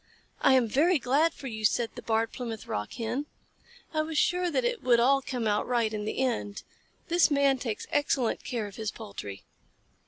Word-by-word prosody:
"I 270 Hz, -, +5 dB
am 255 Hz, -3 st, +4 dB
very 315 Hz, -, +3 dB
glad 285 Hz, +5 st, +2 dB
for -, -, -12 dB
you," 220 Hz, -4 st, -5 dB
said 230 Hz, +2 st, +2 dB
the -, -, -8 dB
Barred 225 Hz, 0 st, 0 dB
Plymouth 230 Hz, -4 st, -6 dB
Rock 105 Hz, 0 st, -4 dB
Hen. 245 Hz, +5 st, -3 dB, 0.7 s
"I 310 Hz, -, +2 dB
was 310 Hz, 0 st, -3 dB
sure 360 Hz, +3 st, +2 dB
that 480 Hz, +9 st, 0 dB
it 485 Hz, -1 st, -1 dB
would 240 Hz, -2 st, +4 dB
all 275 Hz, +3 st, +4 dB
come 250 Hz, -3 st, -3 dB
out 210 Hz, -1 st, +1 dB
right 235 Hz, -3 st, +1 dB
in 210 Hz, -1 st, -3 dB
the 215 Hz, -, -3 dB
end. 235 Hz, -6 st, -1 dB, 0.4 s
This 345 Hz, 0 st, +4 dB
Man 280 Hz, -2 st, +3 dB
takes 230 Hz, -4 st, -4 dB
excellent 285 Hz, -5 st, +1 dB
care 235 Hz, -4 st, -3 dB
of 200 Hz, -2 st, -10 dB
his 220 Hz, -1 st, -2 dB
poultry." 200 Hz, -, -8 dB
245 Hz, 195 wpm, -28 LUFS, 220-285 Hz, 0.7 s, I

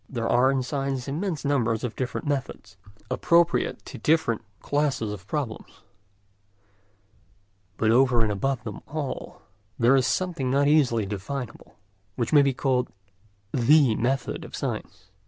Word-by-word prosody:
There 115 Hz, -3 st, -2 dB
are 125 Hz, +2 st, +4 dB
in 135 Hz, -1 st, +1 dB
science 135 Hz, -1 st, -3 dB
immense 160 Hz, +2 st, -3 dB
numbers 120 Hz, -6 st, +1 dB
of 120 Hz, -3 st, -3 dB
different 130 Hz, +5 st, -3 dB
methods, 130 Hz, -8 st, -4 dB, 0.4 s
appropriate 170 Hz, 0 st, +2 dB
to -, -, -9 dB
different 155 Hz, -8 st, +2 dB, 0.2 s
classes 140 Hz, -7 st, -1 dB
of 100 Hz, -1 st, -10 dB
problems; 130 Hz, -5 st, -5 dB, 2.0 s
but 110 Hz, -1 st, +2 dB
over 125 Hz, -1 st, +4 dB
and 110 Hz, -2 st, +1 dB
above 125 Hz, +5 st, -1 dB
them 105 Hz, -4 st, -7 dB
all, 145 Hz, -2 st, -5 dB, 0.3 s
there 120 Hz, +3 st, +5 dB
is 130 Hz, -1 st, +3 dB
something 170 Hz, -8 st, -1 dB
not 140 Hz, +2 st, +3 dB
easily 130 Hz, -8 st, +3 dB
definable, 110 Hz, +5 st, -6 dB, 0.4 s
which 120 Hz, +4 st, -2 dB
may 145 Hz, -, +8 dB
be 140 Hz, -1 st, +3 dB
called 130 Hz, -1 st, 0 dB, 0.6 s
the 135 Hz, 0 st, +5 dB
method 130 Hz, +1 st, -1 dB
of -, -, -9 dB
science. 95 Hz, -, -5 dB
130 Hz, 135 wpm, -25 LUFS, 115-145 Hz, 2.0 s, may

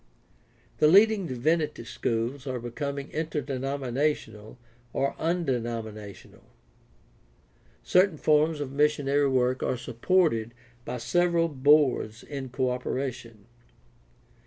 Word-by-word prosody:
The 150 Hz, -, +6 dB
leading 200 Hz, +2 st, +5 dB
divinity 150 Hz, +2 st, -1 dB
schools 120 Hz, +4 st, -3 dB
are 130 Hz, -1 st, -3 dB
becoming 140 Hz, +4 st, -5 dB
interdenominational 135 Hz, -6 st, -3 dB, 0.4 s
or 140 Hz, -, 0 dB
undenomina 120 Hz, -, -2 dB
tional. 100 Hz, -, -15 dB, 1.4 s
Certain 180 Hz, -2 st, +3 dB
forms 155 Hz, +1 st, +2 dB
of 135 Hz, -2 st, -4 dB
missionary 145 Hz, -1 st, +2 dB
work 130 Hz, -1 st, +1 dB
are 125 Hz, -, -1 dB
supported 120 Hz, -3 st, 0 dB, 0.3 s
by -, -, -4 dB
several 170 Hz, +5 st, +1 dB
boards 140 Hz, -5 st, +2 dB
in 135 Hz, -3 st, -6 dB
co 130 Hz, 0 st, -1 dB
operation. 125 Hz, -4 st, -5 dB
140 Hz, 95 wpm, -27 LUFS, 120-155 Hz, 1.4 s, The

